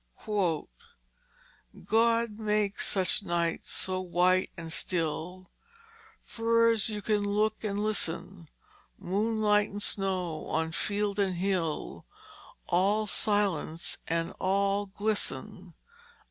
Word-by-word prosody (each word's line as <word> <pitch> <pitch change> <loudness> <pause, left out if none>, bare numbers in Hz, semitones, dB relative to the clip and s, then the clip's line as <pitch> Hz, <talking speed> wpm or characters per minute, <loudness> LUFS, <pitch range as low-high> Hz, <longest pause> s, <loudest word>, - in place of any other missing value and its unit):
"God 230 -1 +2
makes 210 -2 +1
sech 190 +1 +1
nights, 170 -3 -1
so 185 0 -1
white 185 +1 +2
and 165 -1 -4
still 170 +2 -2 0.7
Fer's 230 -1 +2
you 210 -1 -4
can 210 -1 +1
look 210 +2 0
and 205 -1 -1
listen. 180 -4 -3 0.5
Moonlight 210 +1 +1
an' 205 - -6
snow, 185 -5 -1
on 160 0 -1
field 205 +3 -1
and 190 -2 +1
hill, 175 -4 -2 0.6
All 200 +5 +2
silence 195 -6 0
and 165 0 -1
all 200 +1 +1
glisten." 205 +2 -2
200 Hz, 95 wpm, -29 LUFS, 175-210 Hz, 0.7 s, God